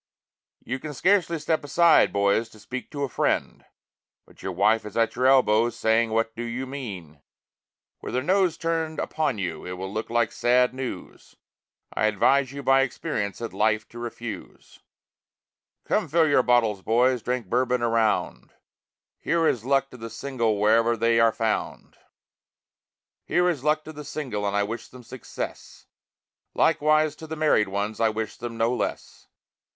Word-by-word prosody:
You 130 Hz, +2 st, -4 dB
can 150 Hz, +1 st, -7 dB
scarcely 180 Hz, 0 st, +2 dB
step 155 Hz, +1 st, -1 dB
aside, 170 Hz, +3 st, +4 dB
boys, 100 Hz, +3 st, +1 dB
to 110 Hz, -, -17 dB
speak 130 Hz, +4 st, -7 dB
to 145 Hz, -1 st, -4 dB
a -, -, 0 dB
friend -, -, -1 dB, 0.6 s
But -, -, -20 dB
your 95 Hz, -, -4 dB
wife 105 Hz, +5 st, +2 dB
is 105 Hz, 0 st, -8 dB
at 115 Hz, -1 st, +1 dB
your 125 Hz, +2 st, +2 dB
elbow 120 Hz, -4 st, +4 dB
saying 115 Hz, 0 st, +1 dB
what 115 Hz, 0 st, -1 dB
do 120 Hz, -, -5 dB
you 120 Hz, +2 st, -4 dB
mean. 100 Hz, -, -8 dB, 0.8 s
With -, -, -5 dB
her 130 Hz, -, 0 dB
nose 185 Hz, 0 st, +2 dB
turned 165 Hz, -1 st, -2 dB
upon 155 Hz, -7 st, -1 dB
you 95 Hz, -3 st, -4 dB
it 90 Hz, -, -6 dB
will 95 Hz, +2 st, -6 dB
look 110 Hz, +1 st, -4 dB
like 120 Hz, -1 st, +1 dB
sad 125 Hz, +1 st, +2 dB
news, 130 Hz, -1 st, -7 dB, 0.6 s
I 110 Hz, -, +1 dB
advise 130 Hz, +5 st, +2 dB
you 140 Hz, 0 st, -7 dB
by 135 Hz, 0 st, +4 dB
experience 105 Hz, -5 st, -3 dB
that 115 Hz, -, -6 dB
life 110 Hz, 0 st, +1 dB
to 120 Hz, -, -10 dB
refuse. 120 Hz, -1 st, -8 dB, 1.1 s
Come -, -, 0 dB
fill 165 Hz, +3 st, +3 dB
up 155 Hz, -, +2 dB
your 140 Hz, -, +4 dB
bottles, 115 Hz, -5 st, +2 dB
boys, 125 Hz, +4 st, +2 dB
drink 125 Hz, 0 st, -2 dB
Bourbon 125 Hz, +3 st, 0 dB
around; 110 Hz, -, 0 dB, 0.7 s
Here 165 Hz, -1 st, +1 dB
is 120 Hz, -2 st, 0 dB
luck 135 Hz, 0 st, +1 dB
to 125 Hz, -, -11 dB
the 115 Hz, -1 st, -7 dB
single 115 Hz, -6 st, -2 dB
wherever 115 Hz, +2 st, +3 dB
they 115 Hz, +1 st, +2 dB
are 115 Hz, 0 st, +5 dB
found. 110 Hz, -1 st, -3 dB, 1.3 s
Here 180 Hz, 0 st, +1 dB
is 155 Hz, -7 st, -1 dB
luck 155 Hz, +1 st, +1 dB
to 155 Hz, -, -9 dB
the 150 Hz, 0 st, -8 dB
single 130 Hz, -9 st, -4 dB
and 100 Hz, 0 st, -1 dB
I 100 Hz, -, +2 dB
wish 115 Hz, +2 st, -5 dB
them 125 Hz, -1 st, -14 dB
success, 125 Hz, +1 st, -8 dB, 0.7 s
Likewise 155 Hz, 0 st, +3 dB
to 160 Hz, -, -10 dB
the 160 Hz, -, -5 dB
married 150 Hz, -9 st, +2 dB
ones, 100 Hz, +2 st, -3 dB
I 115 Hz, -1 st, +3 dB
wish 110 Hz, 0 st, -4 dB
them 120 Hz, -1 st, -6 dB
no 115 Hz, +2 st, +1 dB
less. 125 Hz, -, -5 dB
120 Hz, 170 wpm, -25 LUFS, 110-140 Hz, 1.3 s, are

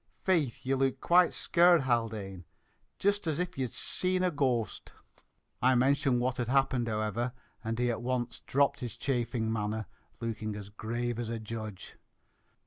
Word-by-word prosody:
"Faith, 160 Hz, -12 st, +1 dB
ye 135 Hz, -, +1 dB
look 135 Hz, -1 st, +1 dB
quite 175 Hz, 0 st, +5 dB
skeared, 175 Hz, -1 st, +4 dB
Haldane, 110 Hz, -7 st, -1 dB, 0.5 s
jist 200 Hz, -2 st, +1 dB
as 155 Hz, -2 st, 0 dB
if 180 Hz, 0 st, -2 dB
ye'd 130 Hz, -4 st, -2 dB
sane 185 Hz, 0 st, -1 dB
a 180 Hz, -, +2 dB
ghoast, 130 Hz, -7 st, -1 dB
sure!" -, -, -24 dB, 0.6 s
I 130 Hz, +2 st, +5 dB
mentioned 135 Hz, 0 st, +3 dB
what 125 Hz, +1 st, 0 dB
had 120 Hz, -, -1 dB
happened, 130 Hz, -2 st, +2 dB
however, 110 Hz, +3 st, -1 dB, 0.3 s
and 115 Hz, 0 st, -2 dB
he 120 Hz, 0 st, +2 dB
at 115 Hz, -, -3 dB
once 125 Hz, -1 st, -2 dB
dropped 140 Hz, +1 st, +1 dB
his 120 Hz, -5 st, -5 dB
chaffing 120 Hz, -4 st, -1 dB
manner, 110 Hz, 0 st, -2 dB, 0.3 s
looking 110 Hz, -2 st, -3 dB
as 100 Hz, -1 st, -7 dB
grave 115 Hz, +3 st, -3 dB
as 120 Hz, -2 st, -3 dB
a 115 Hz, -, -2 dB
judge. 110 Hz, -2 st, -7 dB
120 Hz, 160 wpm, -31 LUFS, 110-135 Hz, 0.6 s, quite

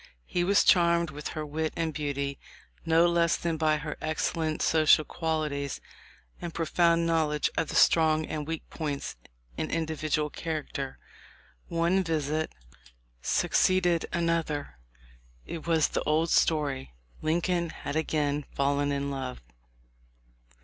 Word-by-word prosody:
He 175 Hz, -, -1 dB
was 200 Hz, +3 st, +4 dB
charmed 170 Hz, -2 st, +4 dB
with 150 Hz, +1 st, -6 dB
her 155 Hz, -, -2 dB
wit 155 Hz, +1 st, -2 dB
and 165 Hz, -1 st, -1 dB
beauty, 140 Hz, -2 st, -3 dB, 0.5 s
no 165 Hz, +1 st, +5 dB
less 170 Hz, -1 st, +2 dB
than 170 Hz, -1 st, -1 dB
by 155 Hz, -1 st, +2 dB
her 150 Hz, 0 st, -5 dB
excellent 155 Hz, 0 st, -1 dB
social 155 Hz, -1 st, +5 dB
qualities 150 Hz, -4 st, -2 dB, 0.6 s
and 170 Hz, -1 st, -6 dB
profound 170 Hz, 0 st, +2 dB
knowledge 155 Hz, -3 st, +1 dB
of 160 Hz, -, 0 dB
the -, -, -5 dB
strong 155 Hz, -1 st, +4 dB
and 150 Hz, -1 st, -4 dB
weak 165 Hz, -1 st, -4 dB
points 145 Hz, -4 st, -4 dB, 0.4 s
in -, -, -2 dB
individual 155 Hz, -2 st, -1 dB
character. 150 Hz, -4 st, -4 dB, 0.7 s
One 170 Hz, +3 st, +1 dB
visit 155 Hz, -1 st, -1 dB, 0.7 s
suc -, -, 0 dB
ceeded 180 Hz, -3 st, +3 dB
another. 165 Hz, -, -1 dB, 0.7 s
It 165 Hz, -1 st, -7 dB
was 160 Hz, -3 st, +3 dB
the -, -, -1 dB
old 155 Hz, +2 st, +1 dB
story. 140 Hz, -, +1 dB, 0.3 s
Lincoln 170 Hz, +2 st, 0 dB
had 145 Hz, -2 st, -6 dB
again 150 Hz, -2 st, 0 dB
fallen 145 Hz, +1 st, +1 dB
in 140 Hz, 0 st, -2 dB
love. 130 Hz, -2 st, -4 dB
155 Hz, 130 wpm, -28 LUFS, 150-165 Hz, 0.7 s, no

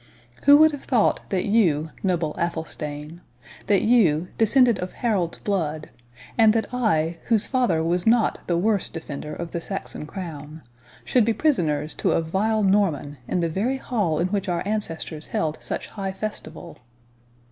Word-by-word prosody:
—Who 285 Hz, +1 st, +9 dB
would 315 Hz, +1 st, +6 dB
have 290 Hz, -2 st, -8 dB
thought 240 Hz, -6 st, +2 dB
that 185 Hz, -2 st, 0 dB
you, 165 Hz, -8 st, +2 dB
noble 170 Hz, -5 st, 0 dB
Athelstane—that 155 Hz, -, -4 dB
you, 180 Hz, -8 st, +3 dB
descended 235 Hz, -1 st, +4 dB
of 180 Hz, 0 st, -5 dB
Harold's 200 Hz, -8 st, -1 dB
blood, 155 Hz, -6 st, -2 dB, 0.5 s
and 220 Hz, -1 st, +6 dB
that 225 Hz, +1 st, -2 dB
I, 170 Hz, -9 st, +1 dB
whose 225 Hz, -3 st, +2 dB
father 245 Hz, -, +1 dB
was 175 Hz, +4 st, 0 dB
not 230 Hz, 0 st, +3 dB
the 170 Hz, -, +1 dB
worst 205 Hz, +2 st, 0 dB
defender 150 Hz, -2 st, -6 dB
of 170 Hz, -1 st, -6 dB
the 170 Hz, -, -3 dB
Saxon 195 Hz, -5 st, -6 dB
crown, 155 Hz, -3 st, -8 dB, 0.4 s
should 250 Hz, -, +3 dB
be 225 Hz, +1 st, +2 dB
prisoners 160 Hz, -, 0 dB
to -, -, +2 dB
a -, -, +2 dB
vile 210 Hz, +6 st, 0 dB
Norman, 185 Hz, -8 st, +1 dB
in 180 Hz, -, 0 dB
the 170 Hz, -, +1 dB
very 220 Hz, +11 st, -1 dB
hall 205 Hz, -12 st, -1 dB
in 175 Hz, +3 st, 0 dB
which 200 Hz, -1 st, -2 dB
our 175 Hz, -1 st, -1 dB
ancestors 165 Hz, -7 st, -4 dB
held 155 Hz, -1 st, -2 dB
such -, -, -4 dB
high 195 Hz, -2 st, -4 dB
festival?" 190 Hz, -5 st, -7 dB
180 Hz, 160 wpm, -24 LUFS, 160-220 Hz, 0.5 s, Who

